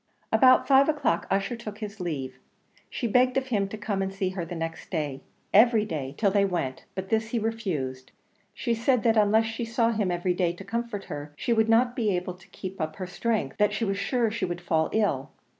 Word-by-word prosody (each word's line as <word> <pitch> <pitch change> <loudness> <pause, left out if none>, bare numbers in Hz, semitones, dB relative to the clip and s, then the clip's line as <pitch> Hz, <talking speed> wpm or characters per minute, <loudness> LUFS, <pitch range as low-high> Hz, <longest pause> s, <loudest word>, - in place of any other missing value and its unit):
About 255 -2 +5
five 275 +1 +6
o'clock 290 - 0
Ussher 195 +5 0
took 215 -3 -8
his 210 -1 -7
leave; 135 -7 -4 0.5
she - - -4
begged 250 +3 +3
of 265 -1 -1
him 205 -5 +1
to 215 - -7
come 205 -2 -2
and 190 0 -1
see 195 -1 -1
her 185 -2 -4
the 165 +1 -6
next 165 0 -5
day 150 -6 -3 0.3
every 220 0 +6
day 145 -6 -4
till 200 -3 +2
they 200 0 +3
went; 170 -9 -2
but 190 0 -5
this 220 0 +1
he 235 - -2
refused; 170 - -3 0.4
she 235 - -2
said 235 +1 +1
that 230 -1 +3
unless 215 +1 +4
she 225 +2 -4
saw 230 0 +1
him 210 -4 0
every 175 +1 0
day 175 -1 0
to 175 - -10
comfort 230 0 -3
her, 145 0 -7
she 235 - 0
would 220 0 +2
not 240 +2 +4
be 215 -6 +1
able 180 0 -3
to 180 - -19
keep 190 -1 -7
up 155 0 -3
her 185 - -5
strength 195 - -2
that 210 0 +3
she 230 - -1
was 195 -1 -1
sure 230 +2 +1
she 230 - -4
would 175 -1 -2
fall 160 -2 +1
ill. 150 -11 0
200 Hz, 225 wpm, -27 LUFS, 175-225 Hz, 0.5 s, five